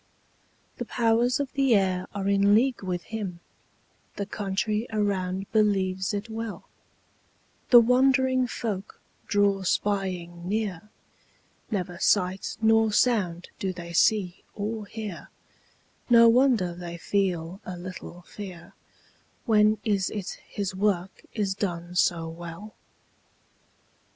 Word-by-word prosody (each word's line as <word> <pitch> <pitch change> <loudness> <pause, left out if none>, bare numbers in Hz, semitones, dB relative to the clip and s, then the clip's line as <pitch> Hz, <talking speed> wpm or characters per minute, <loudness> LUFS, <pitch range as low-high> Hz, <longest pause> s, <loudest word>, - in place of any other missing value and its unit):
The - - -4
powers 235 +2 +2
of 280 -2 -3
the 270 -4 +3
air 185 -2 +1
are 200 -1 -3
in 200 +1 +4
league 255 +2 +2
with 180 -2 -3
him; 200 -6 -5 0.8
The 200 - -3
country 210 +3 -2
around 195 -3 -1
believes 190 -3 +1
it 205 +1 -3
well; 225 -1 -6 1.0
The 240 - +10
wondering 260 +1 +3
folk 210 -5 -5 0.3
draw 200 -1 +2
spying 180 -3 -2
near; 210 -2 -2 0.8
Never 180 -5 -3
sight 185 -1 +1
nor 225 0 +4
sound 195 -7 +1
do 190 - -1
they 170 -1 -8
see 185 0 +2
or 210 0 -4
hear; 210 -6 -7 0.8
No 235 -1 +8
wonder 230 -7 +4
they 170 -1 -7
feel 180 -1 -1
a 185 -1 -6
little 180 0 -9
fear; 185 -2 -10 0.7
When 215 -1 +4
is 200 -4 +1
it 200 -3 -5
his 200 -2 -3
work 190 -1 -1
is 205 -4 0
done 175 -3 -4
so 170 -1 +2
well? 170 +5 -9
200 Hz, 115 wpm, -26 LUFS, 180-220 Hz, 1.0 s, The